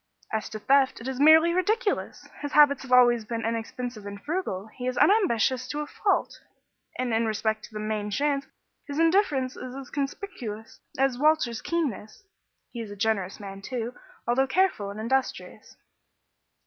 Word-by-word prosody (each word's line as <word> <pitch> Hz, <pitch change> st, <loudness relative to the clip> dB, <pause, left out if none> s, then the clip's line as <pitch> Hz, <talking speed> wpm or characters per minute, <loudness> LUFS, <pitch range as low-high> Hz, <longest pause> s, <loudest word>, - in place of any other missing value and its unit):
As 220 Hz, -, -2 dB
to 215 Hz, -, -6 dB
theft, 270 Hz, +4 st, +3 dB
it 230 Hz, -, -7 dB
is 265 Hz, -1 st, -4 dB
merely 320 Hz, +3 st, +7 dB
ridiculous. 415 Hz, +5 st, -1 dB
His 290 Hz, 0 st, -5 dB
habits 290 Hz, -2 st, +6 dB
have 265 Hz, -, -10 dB
always 240 Hz, -2 st, +6 dB
been 225 Hz, 0 st, -4 dB
inexpensive 230 Hz, -1 st, -4 dB
and 200 Hz, 0 st, -7 dB
frugal, 290 Hz, -, -3 dB
he 250 Hz, -1 st, -5 dB
is 255 Hz, -, -2 dB
unambitious 260 Hz, -, +3 dB
to 295 Hz, +3 st, -3 dB
a -, -, -3 dB
fault, 395 Hz, +6 st, -1 dB, 0.6 s
and 250 Hz, -2 st, -1 dB
in 225 Hz, 0 st, +2 dB
respect 215 Hz, 0 st, -1 dB
to -, -, -17 dB
the -, -, -3 dB
'main 215 Hz, -1 st, -2 dB
chance' 280 Hz, +5 st, 0 dB, 0.4 s
his 285 Hz, 0 st, -5 dB
indifference 325 Hz, -7 st, +2 dB
is 255 Hz, 0 st, -8 dB
as 270 Hz, -2 st, -9 dB
conspicuous 275 Hz, -, -5 dB, 0.2 s
as 265 Hz, -2 st, +1 dB
Walter's 300 Hz, -6 st, +2 dB
keenness. 280 Hz, -, -3 dB, 0.5 s
He 235 Hz, -, -6 dB
is 220 Hz, -, -7 dB
a 205 Hz, -, -8 dB
generous 205 Hz, -2 st, -1 dB
man, 195 Hz, -1 st, -8 dB
too, 240 Hz, +2 st, -4 dB, 0.3 s
although 260 Hz, +3 st, +2 dB
careful 265 Hz, -, +1 dB
and 200 Hz, +2 st, -7 dB
industrious." 260 Hz, +4 st, -3 dB
255 Hz, 165 wpm, -26 LUFS, 220-290 Hz, 0.6 s, merely